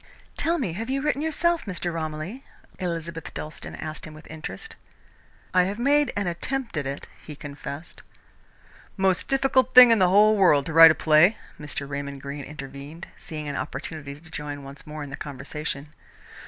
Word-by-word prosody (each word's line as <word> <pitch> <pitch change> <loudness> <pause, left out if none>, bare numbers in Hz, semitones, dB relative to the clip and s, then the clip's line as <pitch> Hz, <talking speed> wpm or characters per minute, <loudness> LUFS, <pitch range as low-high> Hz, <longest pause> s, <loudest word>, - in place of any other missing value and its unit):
"Tell 335 +1 +1
me, 225 - -2
have 225 +7 -5
you 270 +1 0
written 285 0 0
yourself, 335 +2 +1
Mr. 180 -3 -3
Romilly?" 160 - -4 0.4
Elizabeth 170 -2 -4
Dalstan 155 - -6
asked 155 0 -6
him 155 - -11
with 155 - -13
interest. 300 - -6 0.8
"I 180 -1 +5
have 200 +2 -3
made 285 +4 +3
an 205 - -1
attempt 235 +8 -3
at 145 -3 -1
it," 140 +1 -5 0.2
he 150 - -9
confessed. 145 +2 -8 1.0
"Most 190 -2 +2
difficult 270 -1 +2
thing 250 -2 +11
in 225 - +5
the 185 -1 +5
whole 210 +3 +6
world 150 -9 +5
to 160 - -4
write 165 0 +11
a 155 - +3
play," 160 +7 +5 0.2
Mr. 145 -2 -5
Raymond 140 0 -5
Greene 140 0 -6
intervened, 145 +2 -9
seeing 155 -2 -7
an 145 - -3
opportunity 140 0 -6
to 160 +1 -17
join 145 -2 -5
once 140 +2 -11
more 150 0 -6
in 140 - -8
the - - -4
conversation. 145 +1 -6
160 Hz, 175 wpm, -25 LUFS, 145-210 Hz, 1.0 s, thing